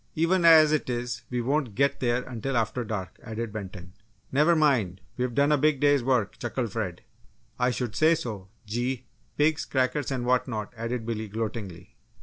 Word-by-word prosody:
"Even 170 Hz, +2 st, +2 dB
as 160 Hz, -2 st, +8 dB
it 155 Hz, -4 st, 0 dB
is 120 Hz, -2 st, -3 dB
we 125 Hz, -1 st, -1 dB
won't 135 Hz, -3 st, -1 dB
get 140 Hz, +1 st, +2 dB
there 125 Hz, 0 st, +1 dB
until 125 Hz, +1 st, -3 dB
after 115 Hz, +2 st, 0 dB
dark!" 105 Hz, -4 st, -5 dB
added 115 Hz, -1 st, -5 dB
Benton. 95 Hz, -4 st, -8 dB, 0.4 s
"Never 150 Hz, +5 st, +4 dB
mind, 125 Hz, -, +2 dB, 0.2 s
we've 125 Hz, -1 st, -2 dB
done 140 Hz, +1 st, +3 dB
a 150 Hz, -, +3 dB
big 150 Hz, -1 st, +2 dB
day's 145 Hz, -2 st, +3 dB
work!" 120 Hz, -6 st, 0 dB
chuckled 120 Hz, -1 st, -3 dB
Fred. 95 Hz, -6 st, -4 dB, 0.6 s
"I 125 Hz, 0 st, +3 dB
should 120 Hz, -2 st, -3 dB
say 160 Hz, +7 st, +4 dB
so! 110 Hz, -, -6 dB, 0.2 s
Gee! 120 Hz, +4 st, -2 dB, 0.3 s
pigs, 150 Hz, +1 st, +2 dB
crackers, 130 Hz, +1 st, 0 dB
and 130 Hz, -3 st, -2 dB
whatnot!" 125 Hz, -4 st, 0 dB
added 115 Hz, 0 st, -3 dB
Billy, 110 Hz, -1 st, -3 dB
gloatingly. 100 Hz, -4 st, -6 dB
125 Hz, 170 wpm, -27 LUFS, 110-140 Hz, 0.6 s, as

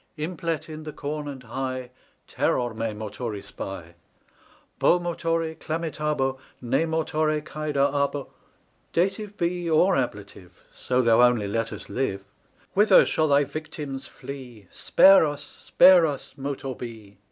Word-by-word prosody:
Implet 165 Hz, 0 st, -3 dB
in 155 Hz, -1 st, -8 dB
the 155 Hz, 0 st, -7 dB
Corn 145 Hz, +1 st, -5 dB
and 135 Hz, -3 st, -7 dB
High 130 Hz, +1 st, -4 dB, 0.4 s
Terror 120 Hz, -2 st, 0 dB
me 115 Hz, +1 st, -2 dB
Motoris 105 Hz, 0 st, -6 dB
Bi: 85 Hz, -3 st, -7 dB, 0.9 s
Bo 180 Hz, -, +4 dB
Motori 165 Hz, -1 st, -1 dB
clamitabo 150 Hz, -5 st, -2 dB, 0.2 s
Ne 130 Hz, +6 st, 0 dB
Motore 155 Hz, -1 st, 0 dB
caedar 145 Hz, -3 st, 0 dB
a 140 Hz, 0 st, +2 dB
Bo— 140 Hz, -1 st, -7 dB, 0.6 s
Dative 200 Hz, +4 st, -1 dB
be 175 Hz, 0 st, -1 dB
or 175 Hz, +4 st, +4 dB
Ablative 100 Hz, -7 st, -5 dB
So 125 Hz, 0 st, 0 dB
thou 115 Hz, 0 st, +5 dB
only 120 Hz, -4 st, +4 dB
let 115 Hz, +3 st, -2 dB
us 105 Hz, -, -8 dB
live:— 100 Hz, -7 st, -2 dB, 0.5 s
Whither 205 Hz, -1 st, +6 dB
shall 155 Hz, -, +1 dB
thy 145 Hz, 0 st, +4 dB
victims 145 Hz, -2 st, -6 dB
flee? 125 Hz, -7 st, -10 dB
Spare 195 Hz, -1 st, +6 dB
us, 145 Hz, -2 st, -2 dB
spare 180 Hz, -3 st, +5 dB
us, 145 Hz, -3 st, -6 dB
Motor 135 Hz, -1 st, -4 dB
Be! 110 Hz, -5 st, -10 dB
140 Hz, 135 wpm, -25 LUFS, 120-160 Hz, 0.9 s, Whither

